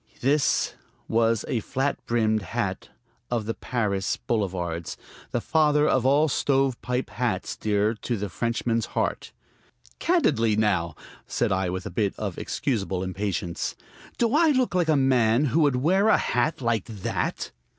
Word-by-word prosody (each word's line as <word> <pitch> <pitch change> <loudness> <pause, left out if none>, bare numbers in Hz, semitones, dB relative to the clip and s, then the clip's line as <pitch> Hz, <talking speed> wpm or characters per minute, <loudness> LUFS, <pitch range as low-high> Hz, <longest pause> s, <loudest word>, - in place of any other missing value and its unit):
"This" 140 +3 +2 0.3
was 115 -1 +2
a 120 - 0
flat 135 +6 -2
brimmed 110 -2 +2
hat 95 - -3 0.4
of 120 -3 -1
the 115 - -2
Paris 100 -7 -1
boulevards, 90 -6 -2 0.3
the 120 - -1
father 150 0 +3
of 130 -1 +2
all 145 +3 +4
stovepipe 135 -3 0
hats, 115 -7 -2
dear 105 +1 +1
to 115 +1 -3
the 105 +1 -3
Frenchman's 115 +3 -1
heart. - - -1 0.7
"Candidly, 135 - +2
now," 95 -7 +1 0.3
said - - 0
I 95 -1 +1
with 95 +1 -4
a - - -5
bit 100 +1 0
of - - -4
excusable 95 -8 -2
impatience, 95 -2 -3 0.4
"do 235 0 +1
I 330 +2 +5
look 255 -7 +2
like 175 -3 +1
a 155 - +5
man 130 -1 +3
who 145 +4 +1
would 145 -4 +3
wear 185 +11 +3
a - - +6
hat 125 +5 0
like 115 -4 0
that?" 105 -5 -3
115 Hz, 150 wpm, -25 LUFS, 100-135 Hz, 0.7 s, a